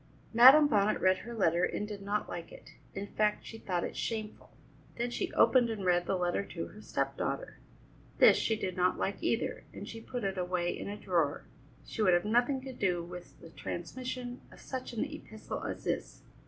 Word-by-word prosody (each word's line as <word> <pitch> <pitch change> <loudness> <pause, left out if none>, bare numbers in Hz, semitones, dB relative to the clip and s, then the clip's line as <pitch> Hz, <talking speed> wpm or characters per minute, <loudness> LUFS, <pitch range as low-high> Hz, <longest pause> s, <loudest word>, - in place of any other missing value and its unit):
Madam 265 +6 +9
Bonnet 210 -5 +2
read 185 0 +4
her 235 +1 -8
letter 175 -4 +2
and 210 - -1
did 205 -2 -7
not 205 +1 -1
like 170 -1 -7
it. - - -13 0.2
In 195 +1 -3
fact, 210 +1 0
she 225 - -9
thought 180 -4 -2
it - - -4
shameful. 220 -2 -4 0.5
Then 240 +1 -1
she - - -2
opened 245 -3 +5
and 210 -4 -4
read 175 -1 +2
the - - +1
letter 180 +2 0
to 170 -4 -6
her 215 - -13
step - - -2
daughter. - - -3 0.6
This - - +8
she 225 - +1
did 185 -4 -3
not 180 0 +2
like 195 - -2
either, 230 - -1
and 205 - -8
she 225 - -8
put 245 0 -5
it 195 -1 -1
away 180 -1 -1
in - - -6
a 205 - -5
drawer; 170 -8 0 0.4
she - - -5
would 185 -4 +5
have 175 - +1
nothing 245 +5 +2
to 265 0 -7
do 180 -7 0
with 175 +1 -10
the 165 - -12
transmission 250 +9 -5
of - - -15
such 260 -1 -6
an 235 +2 -1
epistle 290 -7 -7
as - - -5
this. - - -3
210 Hz, 205 wpm, -31 LUFS, 180-235 Hz, 0.6 s, Madam